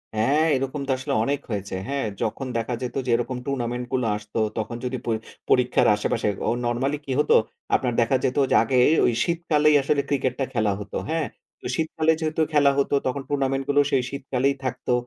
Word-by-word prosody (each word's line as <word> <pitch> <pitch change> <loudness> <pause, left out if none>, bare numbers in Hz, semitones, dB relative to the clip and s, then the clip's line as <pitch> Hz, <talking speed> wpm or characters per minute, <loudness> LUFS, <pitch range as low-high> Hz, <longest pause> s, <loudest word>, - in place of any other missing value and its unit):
হ্যাঁ, 140 +9 +3
এরকম 135 +2 -2
তো - - 0
আসলে 130 - -3
অনেক 140 +3 0
হয়েছে। 100 -2 -3
হ্যাঁ, 140 -3 -1 0.2
যখন 120 +5 -2
দেখা 115 +2 -2
যেত 125 0 -4
যে - - -4
এরকম 125 +1 -2
টুর্নামেন্ট 125 -2 -2
গুলো 125 -2 +1
আসতো 105 +1 -5 0.2
তখন 110 +2 -3
যদি 130 +1 -2
পর 115 -2 +1 0.3
পরীক্ষার 125 -1 +3
আশেপাশে 105 - -1 0.2
ও - - +3 0.2
নরমালি 130 +5 0
কি - - -4
হতো - - +4 0.4
আপনার 125 -2 0
দেখা 125 +3 +2
যেত 130 - -1
যে - - +3
আগে 125 +2 0 0.5
শীতকালেই 155 -3 +2
আসলে 140 +1 +1
ক্রিকেটটা 135 -1 0
খেলা 110 -3 +1
হতো, 105 - -5
হ্যাঁ। 160 -1 0 0.5
শীতকালে 160 0 +1
যেহেতু 160 0 -1
খেলা 145 -2 +5
হত 140 - +1 0.2
তখন 135 +2 -2
টুর্নামেন্ট 135 -1 0
গুলো 145 0 +5
সেই 130 -2 +2
শীতকালেই 140 0 -1
থাকতো। 125 -1 -2
135 Hz, 180 wpm, -24 LUFS, 120-140 Hz, 0.5 s, খেলা